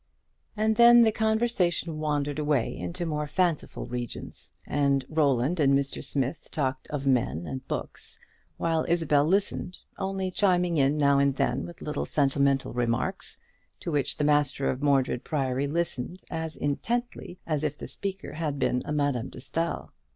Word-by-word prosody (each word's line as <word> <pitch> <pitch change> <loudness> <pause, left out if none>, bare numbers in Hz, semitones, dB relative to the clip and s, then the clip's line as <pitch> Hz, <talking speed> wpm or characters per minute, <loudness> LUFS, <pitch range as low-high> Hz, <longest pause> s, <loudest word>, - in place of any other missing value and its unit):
And 220 +1 +2
then 240 0 +8
the 220 - +4
conversation 220 -8 0
wandered 145 -1 -1
away 145 -5 +1
into 90 - -4
more 150 -2 -2
fanciful 170 -1 -1
regions; 120 -1 -6 0.2
and 140 -2 +1
Roland 150 +1 +1
and 140 -2 +5
Mr. 140 0 -2
Smith 135 +3 -2
talked 130 -3 -2
of 145 -2 -4
men 100 - +1
and 130 +5 -6
books, - - -5 0.4
while 165 -1 +1
Isabel 160 -4 +3
listened, 185 0 0 0.2
only 190 -1 -2
chiming 180 -3 +2
in 140 +1 +3
now 140 -1 +4
and 140 -1 +2
then - - 0
with 170 - -11
little 150 - -2
sentimental 140 -2 +1
remarks, 120 -1 -2 0.4
to 170 - -3
which 145 -3 0
the - - 0
master 145 -2 +2
of 130 - -5
Mordred 135 -4 +2
Priory 135 -2 -1
listened 170 +1 -3
as 160 -1 -4
intently 230 - -2
as 155 -2 -1
if 150 -1 -1
the - - -7
speaker 195 -1 -4
had 155 -3 -2
been 125 -2 +1
a - - -4
Madame 145 -5 0
de - - -13
Staël. 165 +6 -3
150 Hz, 160 wpm, -27 LUFS, 135-170 Hz, 0.4 s, then